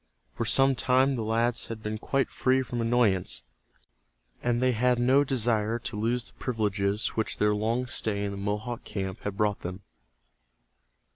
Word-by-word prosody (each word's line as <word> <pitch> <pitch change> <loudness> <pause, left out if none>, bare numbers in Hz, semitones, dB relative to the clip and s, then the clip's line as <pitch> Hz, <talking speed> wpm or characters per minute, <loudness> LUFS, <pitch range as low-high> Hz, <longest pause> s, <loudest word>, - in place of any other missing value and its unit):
For 115 - -3
some 135 +4 +5
time 130 +3 +2
the 120 - -2
lads 115 +2 +1
had 110 -1 -7
been 110 0 -3
quite 135 +3 0
free 130 0 +2
from 120 -2 -4
annoyance, 115 - +1 1.0
and 120 0 +1
they 130 0 +3
had 125 +1 +2
no 130 +4 +4
desire 115 -4 0
to 115 - -5
lose 115 +3 0
the - - -31
privileges 105 -3 -1
which 110 - -2
their 105 0 +3
long 115 +4 0
stay 105 -4 -1
in 100 - -2
the 100 - -6
Mohawk 105 +4 -3
camp 95 -2 -4
had 100 -1 -5
brought 105 -2 +1
them. 90 +3 -7
115 Hz, 165 wpm, -28 LUFS, 105-125 Hz, 1.0 s, some